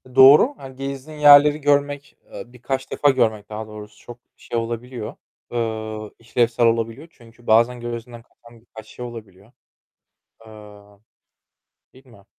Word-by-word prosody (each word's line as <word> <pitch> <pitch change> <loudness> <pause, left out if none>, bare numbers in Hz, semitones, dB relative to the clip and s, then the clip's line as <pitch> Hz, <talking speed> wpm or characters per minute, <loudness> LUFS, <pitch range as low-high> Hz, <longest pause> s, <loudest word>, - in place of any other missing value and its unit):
Doğru 140 - +7
hani 130 -1 -11
gezdiğin 135 +3 -7
yerleri 145 +1 +7
görmek, 145 0 -1
eee, - - -8
birkaç 130 +2 -5
defa 145 - +2
görmek 110 -6 0
daha 110 0 -7
doğrusu 105 -1 -12
çok 120 -1 -10 0.2
şey 120 - -6
olabiliyor, 115 0 -5 0.4
eee, 110 -2 -4
işlevsel 115 0 0
olabiliyor 115 +6 -1
çünkü 120 -2 -20
bazen 120 +3 +3
gözünden 120 0 -7
kaçan 115 0 -21
birkaç 110 -2 -14
şey 125 - -9
olabiliyor. 110 -3 -12 1.0
Eee. 105 -2 -15 1.0
Değil 135 +1 -20
mi? 100 -6 -19
120 Hz, 130 wpm, -21 LUFS, 110-130 Hz, 1.0 s, Doğru